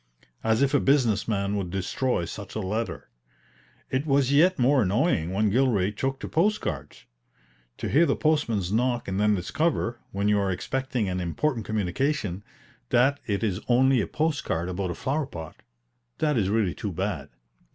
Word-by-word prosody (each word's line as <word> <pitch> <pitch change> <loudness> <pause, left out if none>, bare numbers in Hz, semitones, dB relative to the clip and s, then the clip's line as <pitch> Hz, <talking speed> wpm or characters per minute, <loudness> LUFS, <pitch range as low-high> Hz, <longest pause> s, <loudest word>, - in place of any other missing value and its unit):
As 110 +3 +2
if 140 0 +1
a 145 - +5
business 125 -7 +2
man 100 -2 0
would 95 -3 -2
destroy 95 +3 -1
such - - -8
a - - -1
letter. 110 +3 -3 0.8
It 135 +4 -1
was 135 -2 +3
yet 175 +6 +5
more 130 +2 +4
annoying 100 - +1
when 105 +2 +1
Gilray 110 -6 +2
took 135 +4 -2
to - - -4
post 210 +6 +2
cards. 75 -2 -6 0.7
To - - -3
hear 165 +5 +4
the 140 - +2
postman's 115 - 0
knock 120 +2 0
and 95 0 -2
then 105 0 +3
discover, 120 - -1
when 100 +1 -1
you 105 0 +3
are 100 -1 0
expecting 125 +3 -2
an 90 0 -2
important 115 - -1
communication, 105 - -1 0.5
that 135 +4 +3
it 100 0 -1
is 100 -2 -1
only 130 +1 +4
a - - -2
post 155 -1 -1
card 85 +2 -2
about 90 0 -2
a 85 - -3
flower 140 +1 -1
pot 80 - -8 0.6
that 150 -2 +1
is 100 -5 +1
really 105 -5 +1
too 100 +7 -4
bad. 90 -6 -3
110 Hz, 175 wpm, -26 LUFS, 95-135 Hz, 0.8 s, a